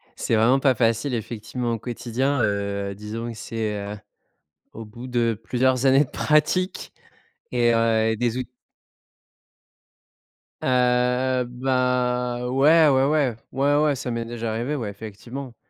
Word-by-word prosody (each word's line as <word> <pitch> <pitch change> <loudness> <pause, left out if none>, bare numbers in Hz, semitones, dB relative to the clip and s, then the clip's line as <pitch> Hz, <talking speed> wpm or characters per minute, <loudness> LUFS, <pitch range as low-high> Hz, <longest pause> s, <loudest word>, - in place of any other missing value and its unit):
C'est 115 - 0
vraiment 120 +5 +4
pas 130 -1 +3
facile 115 +4 +1
effectivement 120 +2 -4
au 115 - -3
quotidien, 125 +3 -2
heu, 100 -1 -1
disons 110 +4 -6
que 110 - -10
c'est 110 -1 -3
heu, 100 +1 -6 0.8
au 115 - -8
bout 120 +4 -10
de 120 -2 +1
plusieurs 130 +2 +1
années 135 +2 +5
de - - -19
pratique 155 +5 0 0.6
et 120 -1 +3
heu, 115 -1 +2
et - - -1
des 120 +1 -1
ou 130 - -1 2.2
hem, 125 0 +2
bah, 125 -1 0
ouais. 150 +5 +5
Ouais, 135 -1 +4
ouais. 145 -7 +1 0.2
Ouais, 140 +2 +2
ouais, 150 -2 +2
ça 125 -1 -5
m'est 115 0 -2
déjà 115 -1 -4
arrivé, 120 +7 -2
ouais, 110 -6 -4
effectivement, 115 +5 -8
125 Hz, 140 wpm, -23 LUFS, 115-130 Hz, 2.2 s, années